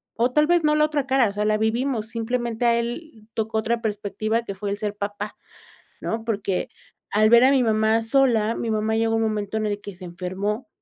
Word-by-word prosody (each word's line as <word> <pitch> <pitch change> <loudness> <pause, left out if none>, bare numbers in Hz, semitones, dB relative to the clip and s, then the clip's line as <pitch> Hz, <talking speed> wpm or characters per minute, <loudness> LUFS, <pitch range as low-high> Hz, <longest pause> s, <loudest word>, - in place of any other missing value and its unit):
o 240 +2 +1
tal 300 +3 +4
vez 345 +1 +3
no 300 0 +3
la 300 0 +4
otra 295 -3 -2
cara, 260 -4 +3
o - - -7
sea, 205 +1 -1
la 215 0 +2
vivimos, 220 +1 0
simplemente 235 0 -2
a 235 0 +4
él 235 -1 -5
tocó 220 0 -2
otra 230 +1 0
perspectiva 215 +1 -2
que 200 - -5
fue 200 +1 -5
el 200 - -2
ser 210 -1 -3
papá, 205 0 -5 0.7
¿no? 225 0 -3
Porque 200 -4 -2 0.4
al 215 +1 +4
ver 235 0 +7
a 265 - +6
mi 270 -2 +4
mamá 220 0 +2
sola, 230 -3 +2
mi 230 - -3
mamá 215 0 0
llegó 225 0 +1
un 225 - +1
momento 215 -1 -2
en 215 - -1
el 205 -1 -2
que 205 -2 -9
se 185 - -11
enfermó, 185 - -4
220 Hz, 220 wpm, -23 LUFS, 210-235 Hz, 0.7 s, ver